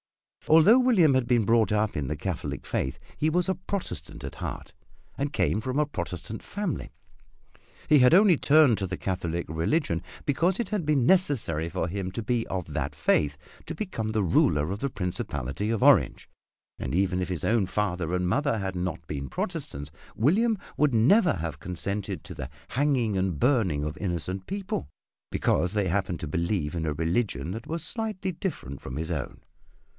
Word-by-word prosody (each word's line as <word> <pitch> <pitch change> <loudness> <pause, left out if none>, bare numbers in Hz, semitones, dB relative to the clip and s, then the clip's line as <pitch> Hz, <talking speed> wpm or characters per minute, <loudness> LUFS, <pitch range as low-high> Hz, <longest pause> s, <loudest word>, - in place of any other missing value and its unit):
Although 165 +11 +7
William 210 - +5
had 130 -2 +1
been 120 -3 +3
brought 115 -1 +3
up 105 0 +1
in 70 -3 -2
the 75 - -2
Catholic 85 +2 -4
faith 65 - -2 0.2
he 155 - +1
was 175 +2 +1
a 190 - +2
Protestant 185 +2 -5
at - - -6
heart, - - -5 0.4
and 140 +1 -2
came 110 -7 +1
from 130 +4 -3
a 150 - +3
Protestant 95 - -5
family. 205 -5 -4 1.0
He 150 - +6
had 125 +5 +6
only 195 -2 +6
turned 145 -7 +5
to 95 - -2
the 95 - -4
Catholic 85 -3 -2
religion 85 - 0 0.2
because 170 - +1
it 235 - -2
had 210 -5 -1
been 140 -5 +3
necessary 125 - +2
for 85 - -2
him 95 +1 -3
to 115 - -4
be 120 0 0
of 90 -5 -4
that 70 +1 -2
faith 75 -2 +2 0.3
to - - -4
become 155 - -3
the 110 -1 +1
ruler 75 -2 +2
of 100 - -3
the 140 - -1
Principality 90 - -3
of 115 -2 0
Orange, - - +4 0.5
and 65 +4 -3
even 95 -1 +1
if 90 - -3
his 90 -4 -3
own 110 -4 +2
father 90 -4 -1
and 90 0 0
mother 140 +4 +1
had 95 -2 -3
not 90 -2 -3
been 70 -2 -5
Protestants, 70 +3 -4 0.2
William 210 - +3 0.2
would 150 -5 +3
never 165 - +5
have 80 -3 -4
consented 95 +4 -4
to - - -8
the 70 -4 -6 0.2
hanging 130 -6 +1
and 95 -5 -1
burning 105 - +2
of 75 +1 -3
innocent 90 0 -3
people 195 - -3 0.4
because 90 +5 +1
they 105 -3 +1
happened 90 -2 -1
to 80 - -4
believe 85 -1 -1
in 80 -2 -2
a 75 - 0
religion 80 - -1
that 115 +4 -6
was 165 0 -3
slightly 215 -5 -2
different 160 - -5
from 65 +1 -6
his 80 +2 -3
own. 70 -6 -4
100 Hz, 180 wpm, -27 LUFS, -, 1.0 s, Although